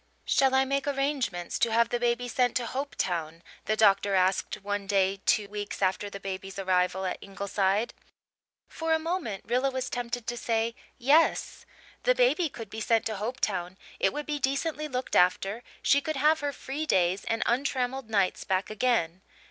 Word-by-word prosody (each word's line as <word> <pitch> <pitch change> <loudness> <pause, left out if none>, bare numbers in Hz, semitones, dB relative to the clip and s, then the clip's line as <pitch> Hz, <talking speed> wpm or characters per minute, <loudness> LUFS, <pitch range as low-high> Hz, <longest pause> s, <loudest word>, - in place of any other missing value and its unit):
"Shall 265 -1 +3
I 265 0 +4
make 275 +1 -1
arrangements 275 -11 -1
to 230 - +2
have 230 +1 +3
the 240 - -1
baby 240 +1 0
sent 245 0 +1
to 245 - 0
Hopetown?" 175 - -3 0.2
the 215 - +1
doctor 200 -2 +4
asked 185 0 +2
one 205 0 -3
day 195 -1 +1
two 210 -1 +3
weeks 205 0 -5
after 195 +1 0
the 200 - -8
baby's 195 0 -6
arrival 185 0 +1
at 185 - -3
Ingleside. 200 +2 -1 0.7
For 325 0 -1
a - - +4
moment 320 - -3
Rilla 250 +4 +1
was 260 -1 -3
tempted 245 -1 -3
to 240 - -3
say 230 0 0 0.2
"Yes." 290 +7 +2 0.3
The - - +3
baby - - +3
could 225 -6 -9
be 220 - -5
sent 225 0 +2
to 220 -2 -2
Hopetown 195 -5 -2 0.2
it 195 - +3
would 295 +6 -4
be 295 -1 -2
decently 290 +3 -1
looked 255 -2 -3
after 195 +5 +3 0.2
she 280 - +4
could 310 +1 -3
have 305 +3 +3
her 290 -1 -1
free 285 +3 -5
days 185 -3 +2
and 225 - 0
untrammelled 255 -1 -1
nights 200 -4 +1
back 190 +2 -1
again. 215 -7 0
230 Hz, 175 wpm, -28 LUFS, 195-270 Hz, 0.7 s, I